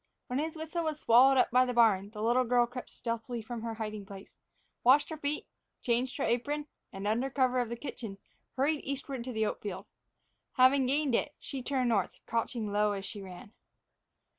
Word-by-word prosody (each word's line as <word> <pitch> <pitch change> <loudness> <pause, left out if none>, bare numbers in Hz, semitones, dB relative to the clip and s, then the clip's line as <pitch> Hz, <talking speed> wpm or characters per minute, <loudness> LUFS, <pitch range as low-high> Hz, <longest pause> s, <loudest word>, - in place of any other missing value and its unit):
When 255 0 -2
his 315 +2 -2
whistle 320 +2 -3
was 305 -1 -2
swallowed 260 +3 +6
up 250 - +3
by 250 +1 +6
the 250 -1 -2
barn, 205 -4 +4
the 210 0 -6
little 240 +3 +3
girl 245 0 +3
crept 245 +1 -8
stealthily 230 0 -4
from 235 0 -6
her 225 0 -4
hiding 215 -2 -5
place, 195 0 -12 0.5
washed 275 +6 +5
her 315 - -4
feet, 290 0 -2 0.4
changed 245 +1 0
her - - -1
apron, 290 +6 0 0.3
and, 195 +1 -5
under 235 +5 +1
cover 255 -2 +2
of 240 -2 -1
the 235 - -3
kitchen, 230 -5 -7 0.4
hurried 285 +3 +1
eastward 270 -2 -4
to 255 - -4
the 220 -2 0
oat - - -3
field. 200 -3 -5 0.7
Having 260 0 +5
gained 280 0 +1
it, 285 - +1
she 270 -2 -6
turned 255 -1 0
north, 205 -5 +1
crouching 230 -2 -2
low 210 0 +2
as 195 -1 -5
she 205 0 -7
ran. 190 +2 -10
245 Hz, 195 wpm, -31 LUFS, 220-270 Hz, 0.7 s, swallowed